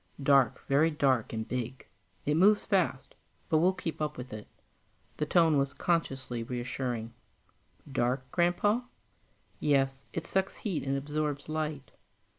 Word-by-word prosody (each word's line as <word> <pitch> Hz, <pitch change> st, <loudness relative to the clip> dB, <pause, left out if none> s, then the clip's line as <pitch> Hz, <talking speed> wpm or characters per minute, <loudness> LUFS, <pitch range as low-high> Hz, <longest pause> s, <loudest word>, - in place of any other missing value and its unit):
"Dark, 135 Hz, -4 st, +4 dB
very 145 Hz, +4 st, +4 dB
dark, 135 Hz, -6 st, +1 dB
and 110 Hz, -1 st, -4 dB
big. 125 Hz, +1 st, -4 dB, 0.4 s
It 150 Hz, -, +2 dB
moves 200 Hz, +6 st, +5 dB
fast, 185 Hz, -9 st, 0 dB, 0.4 s
but 155 Hz, -, +4 dB
we'll 180 Hz, +3 st, +4 dB
keep 165 Hz, -4 st, -5 dB
up 150 Hz, -, -2 dB
with 125 Hz, -2 st, -7 dB
it." 110 Hz, -1 st, -7 dB, 0.7 s
The 150 Hz, -, -1 dB
tone 160 Hz, -3 st, +4 dB
was 140 Hz, 0 st, -1 dB
consciously 135 Hz, -8 st, -1 dB
reassuring. 120 Hz, -1 st, -3 dB, 0.8 s
"Dark, 130 Hz, +1 st, -1 dB
Grandpa?" 180 Hz, +6 st, +2 dB, 0.8 s
"Yes, 135 Hz, -2 st, +1 dB
it -, -, -4 dB
sucks 190 Hz, 0 st, 0 dB
heat 190 Hz, -8 st, -2 dB
and 135 Hz, 0 st, +1 dB
absorbs 145 Hz, 0 st, -2 dB
light. 155 Hz, -3 st, -3 dB
140 Hz, 135 wpm, -30 LUFS, 130-165 Hz, 0.8 s, moves